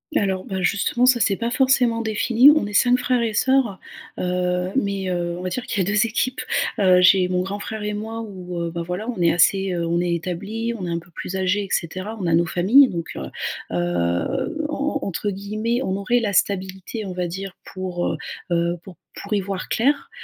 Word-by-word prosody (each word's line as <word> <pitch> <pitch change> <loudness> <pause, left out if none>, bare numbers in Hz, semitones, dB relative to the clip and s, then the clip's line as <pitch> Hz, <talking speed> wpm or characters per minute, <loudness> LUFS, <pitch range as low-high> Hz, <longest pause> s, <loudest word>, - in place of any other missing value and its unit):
Alors 190 -5 0
bah 190 -1 -3
justement, 200 +6 +1
ça 255 -1 +5
c'est 205 -3 +3
pas 235 +4 -2
forcément 255 -3 +3
défini, 230 +4 +5
on 300 -6 +4
est 205 - -6
5 245 +4 +4
frères 250 -1 +1
et 230 -2 -1
soeurs. 260 -3 +2 0.4
Heu, 180 0 -1
mais 200 -5 -1
heu, 175 -1 -2
on - - -6
va 185 - -3
dire 250 +7 -4
qu'il 200 - 0
y - - -2
a - - -2
2 210 +2 +4
équipes. 250 +3 -1 0.4
Heu, 185 -2 +5
j'ai 185 0 +5
mon 180 0 0
grand 195 +2 -4
frère 215 +1 -5
et 210 0 -2
moi 220 +2 -5
où 185 -5 -7
heu, 170 0 -2
bah 170 0 -4
voilà, 195 +6 -4
on 230 -7 -3
est 170 - +4
assez, 190 +3 +3
heu, 170 -1 -1
on 170 +1 0
est 175 0 0
établi, 200 +7 -3
on 205 -6 -5
est - - -4
un 170 0 -1
peu 175 +1 -18
plus 180 - -6
âgés 190 +2 +1
et - - -10
cetera. 185 +6 -2
On - - -2
a 165 - +1
nos 170 +1 +3
familles 205 - +5
donc 170 -5 -5
heu 70 - -4 0.5
heu, 85 - -1
en 300 - -2
en 285 +1 -1
entre 200 +2 -2
guillemets, 215 +4 -2
on 190 - -1
aurait 220 +5 +1
«la 210 -3 -1
stabilité» 190 +3 -1
on 190 - -5
va 180 -1 -2
dire 190 +2 -6
pour, 185 -2 -3
heu - - -2 0.3
heu, 170 0 +1
pour 190 -3 -12 0.3
pour - - -4
y 205 - +3
voir 190 -1 -4
clair. 280 +5 +1
195 Hz, 230 wpm, -22 LUFS, 180-230 Hz, 0.5 s, ça